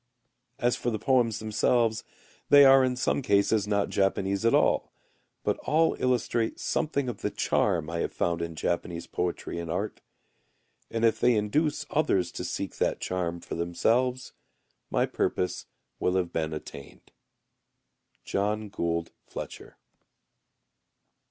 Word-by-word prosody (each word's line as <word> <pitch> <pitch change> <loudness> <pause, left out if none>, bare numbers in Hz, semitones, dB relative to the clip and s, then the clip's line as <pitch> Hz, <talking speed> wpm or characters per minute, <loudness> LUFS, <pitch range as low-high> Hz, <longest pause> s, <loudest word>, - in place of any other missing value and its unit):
As 120 -2 +1
for 120 - -2
the 110 - -1
poems 115 -1 +2
themselves 110 +1 +1 0.5
they 145 0 +9
are 135 0 +7
in 130 -1 +1
some 130 - 0
cases 105 -2 +2
not 100 -1 +1
Japanese 95 +1 0
at 115 - +4
all, - - +2 0.5
but - - 0
all 160 +2 +2
illustrate 120 -2 0
something 140 -4 -1
of 120 -5 -5
the - - 0
charm 75 - 0
I 85 0 -3
have - - -1
found 85 -1 -1
in 85 -1 -4
Japanese 85 +1 -2
poetry 85 -1 -3
and 85 -1 -5
art. 95 +6 -3 0.9
And 115 0 0
if 115 - +2
they 125 -1 +4
induce 145 +8 0
others 100 - +1
to - - -5
seek - - -4
that - - 0
charm 85 -2 -2
for - - -7
themselves, 120 +10 0 0.6
my - - +2
purpose 90 -2 -2 0.3
will 90 - +1
have 90 -2 -1
been 80 -1 -1
attained. 75 -3 -9 1.1
JOHN 105 +1 -1
GOULD 85 -4 -2 0.2
FLETCHER. - - -8
105 Hz, 140 wpm, -28 LUFS, 85-125 Hz, 1.1 s, they